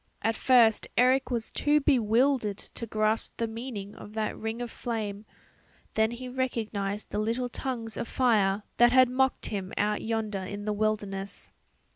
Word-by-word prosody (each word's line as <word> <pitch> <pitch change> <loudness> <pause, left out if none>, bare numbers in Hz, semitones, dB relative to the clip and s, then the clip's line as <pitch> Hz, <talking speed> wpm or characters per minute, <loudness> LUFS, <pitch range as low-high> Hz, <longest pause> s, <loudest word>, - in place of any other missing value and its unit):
At 225 +1 +1
first 235 -4 +4
Eric 255 +2 +4
was 235 -3 -2
too 295 +1 +3
bewildered 245 -4 +2
to 230 - -7
grasp 215 +1 0
the 230 - 0
meaning 225 -3 -6
of 210 - -11
that 215 -1 -2
ring 220 +1 -4
of 240 -1 -4
flame; 215 -3 -4 0.7
then 220 0 +3
he 240 +2 -6
recognized 220 -5 -3
the 205 - -1
little 235 +4 -1
tongues 235 -3 -3
of - - -3
fire 210 -5 +2
that 240 0 +6
had 255 0 +6
mocked 265 +1 +1
him 195 -3 -4
out 210 +1 +1
yonder 220 -3 -2
in 205 +2 -6
the 210 - 0
wilderness. 205 -2 -2
225 Hz, 160 wpm, -28 LUFS, 210-245 Hz, 0.7 s, that